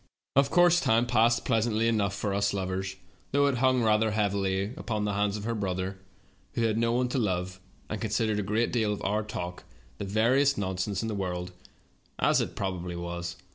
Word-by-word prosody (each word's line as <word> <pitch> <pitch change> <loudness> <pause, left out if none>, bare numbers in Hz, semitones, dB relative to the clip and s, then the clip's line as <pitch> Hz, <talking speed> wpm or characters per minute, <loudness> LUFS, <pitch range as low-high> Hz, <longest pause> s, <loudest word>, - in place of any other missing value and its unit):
"Of 140 0 +4
course 175 +1 +5
time 115 -5 +3
passed 120 0 +3
pleasantly 115 -1 +1
enough 100 -4 +1
for 100 0 -2
us 100 0 +1
lovers, 95 0 -3 0.4
though 140 +1 +3
it 135 -4 +1
hung 130 -1 +3
rather 110 0 +3
heavily 100 -1 0
upon 105 -3 -2
the 105 - -1
hands 100 +1 0
of 105 - -7
her 115 +2 -1
brother, 95 -2 -3 0.5
who 115 - 0
had 110 -2 +2
no 115 0 +2
one 125 +1 +1
to 130 - 0
love, 90 -3 -1 0.3
and 110 - -5
considered 110 -1 0
a - - +1
great 105 +4 0
deal 110 -3 +1
of 105 - -6
our 105 +2 +1
talk 90 -4 -6 0.4
the 100 - -3
veriest 125 +8 +3
nonsense 95 +1 -2
in - - -2
the 110 - -2
world, 90 -2 -3 0.7
as - - +3
it - - -4
probably 90 -3 -3
was. 85 0 -5
105 Hz, 195 wpm, -28 LUFS, 95-115 Hz, 0.7 s, course